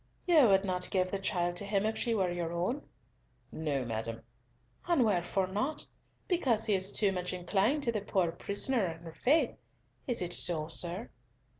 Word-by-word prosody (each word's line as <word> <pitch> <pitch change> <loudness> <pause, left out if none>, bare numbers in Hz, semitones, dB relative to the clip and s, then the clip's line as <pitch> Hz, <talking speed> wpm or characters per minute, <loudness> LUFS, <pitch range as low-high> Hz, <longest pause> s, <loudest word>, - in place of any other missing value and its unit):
"You 320 -8 +6
would 195 -1 +4
not 180 -1 -1
give 185 -1 0
the 195 - -2
child 175 -3 0
to 200 - -4
him 200 0 0
if 220 0 0
she 230 -1 -1
were 185 -4 +1
your 170 -1 -3
own?" 180 +12 -1 0.7
"No, 145 -5 -2
madam." 115 0 -4 0.6
"And 335 -9 +3
wherefore 190 -1 +1
not? 210 +11 -2 0.4
Because 260 - +1
he 215 - +2
is 190 +1 0
too 205 -2 +2
much 180 -1 -3
inclined 195 - +1
to 235 - +1
the 215 -3 -2
poor 190 -4 0
prisoner 200 +6 +1
and 165 -1 -6
her 165 - -8
faith? 295 - +2 0.5
Is 245 -3 +1
it 175 0 -3
so, 160 -3 +2
sir?" 175 +6 0
190 Hz, 180 wpm, -31 LUFS, 175-220 Hz, 0.7 s, You